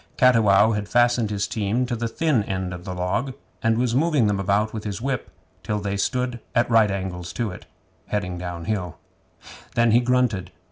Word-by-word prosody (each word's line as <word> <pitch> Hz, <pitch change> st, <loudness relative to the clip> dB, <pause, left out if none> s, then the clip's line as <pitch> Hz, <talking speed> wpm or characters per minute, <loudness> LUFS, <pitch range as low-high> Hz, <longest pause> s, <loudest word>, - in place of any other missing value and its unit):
Cattiwow 110 Hz, -4 st, +5 dB
had 105 Hz, -2 st, -3 dB
fastened 120 Hz, -2 st, +3 dB
his 100 Hz, -1 st, -1 dB
team 110 Hz, +4 st, 0 dB
to 120 Hz, -1 st, -2 dB
the 115 Hz, 0 st, -2 dB
thin 140 Hz, +1 st, +1 dB
end 95 Hz, -1 st, -3 dB
of 90 Hz, 0 st, -9 dB
the 90 Hz, -2 st, -5 dB
log, 115 Hz, +9 st, -2 dB, 0.3 s
and 115 Hz, -2 st, +2 dB
was 120 Hz, -1 st, +1 dB
moving 145 Hz, -2 st, +3 dB
them 105 Hz, -1 st, +1 dB
about 100 Hz, +3 st, +1 dB
with 110 Hz, -2 st, -5 dB
his 105 Hz, -1 st, -4 dB
whip 130 Hz, 0 st, -3 dB, 0.3 s
till 105 Hz, -, -2 dB
they 100 Hz, 0 st, -2 dB
stood 125 Hz, +4 st, -1 dB, 0.2 s
at 120 Hz, -, +3 dB
right 110 Hz, -2 st, +5 dB
angles 90 Hz, -3 st, -4 dB
to 115 Hz, -4 st, -2 dB
it, 90 Hz, -, -11 dB, 0.4 s
heading 90 Hz, -4 st, -2 dB
downhill. 90 Hz, 0 st, -4 dB, 0.8 s
Then 120 Hz, -1 st, +4 dB
he 115 Hz, -, +6 dB
grunted. 125 Hz, -5 st, +1 dB
110 Hz, 185 wpm, -23 LUFS, 100-120 Hz, 0.8 s, he